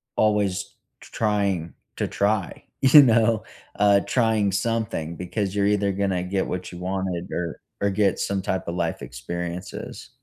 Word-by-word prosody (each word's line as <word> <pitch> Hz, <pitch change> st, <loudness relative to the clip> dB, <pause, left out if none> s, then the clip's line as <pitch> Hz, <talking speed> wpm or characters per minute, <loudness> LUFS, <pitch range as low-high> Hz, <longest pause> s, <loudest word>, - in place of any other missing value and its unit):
always 105 Hz, -2 st, +1 dB, 0.2 s
tr -, -, -15 dB
trying 100 Hz, -6 st, 0 dB, 0.2 s
to -, -, 0 dB
try, 100 Hz, -3 st, -1 dB, 0.2 s
you 135 Hz, +3 st, +9 dB
know? 115 Hz, -3 st, +3 dB, 0.3 s
Uh, 100 Hz, 0 st, +5 dB
trying 110 Hz, -5 st, +1 dB
something 100 Hz, -6 st, -1 dB
because 95 Hz, +3 st, -3 dB
you're 100 Hz, -1 st, +2 dB
either 100 Hz, -1 st, +2 dB
gonna 95 Hz, -2 st, -1 dB
get 95 Hz, +1 st, -1 dB
what 90 Hz, 0 st, -4 dB
you 90 Hz, -, -8 dB
wanted 90 Hz, -1 st, -3 dB
or 85 Hz, -2 st, -3 dB, 0.2 s
or 100 Hz, -, +2 dB
get 100 Hz, -1 st, +1 dB
some 100 Hz, -1 st, -1 dB
type 95 Hz, -1 st, -2 dB
of 85 Hz, -, -3 dB
life 85 Hz, -2 st, -2 dB
experiences. 85 Hz, +7 st, -6 dB
100 Hz, 155 wpm, -24 LUFS, 90-105 Hz, 0.3 s, you